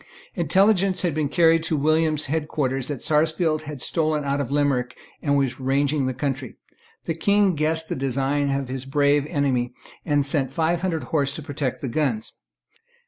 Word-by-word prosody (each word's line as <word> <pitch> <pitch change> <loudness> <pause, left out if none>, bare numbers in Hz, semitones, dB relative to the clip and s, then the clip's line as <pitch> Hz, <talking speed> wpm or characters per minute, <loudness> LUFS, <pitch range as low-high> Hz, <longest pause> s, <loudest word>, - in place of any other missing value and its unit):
Intelligence 195 -1 +2
had 175 -4 +1
been 150 -1 -1
carried 165 +1 +4
to 160 - 0
William's 155 +1 +1
head 150 +1 -2
quarters 135 -4 -1
that 145 -5 -4
Sarsfield 155 +1 +2
had 145 -5 -5
stolen 155 -2 0
out 140 0 0
of 130 - -4
Limerick 140 -3 0 0.2
and 145 -1 +1
was 135 -2 0
ranging 135 +1 +1
the 130 - -1
country. 130 -2 -3 0.5
The 165 - -2
King 200 +4 +2
guessed 160 +1 0
the - - -3
design 135 +2 0
of 135 -1 -1
his 130 0 -5
brave 145 +1 +2
enemy, 130 -6 0 0.3
and 145 -3 +1
sent 140 -2 0
five 165 +3 0
hundred 175 -4 -1
horse 140 -3 -1
to 155 - -6
protect 140 -3 -3
the 135 - -3
guns. 125 -4 -1
145 Hz, 175 wpm, -23 LUFS, 135-160 Hz, 0.5 s, carried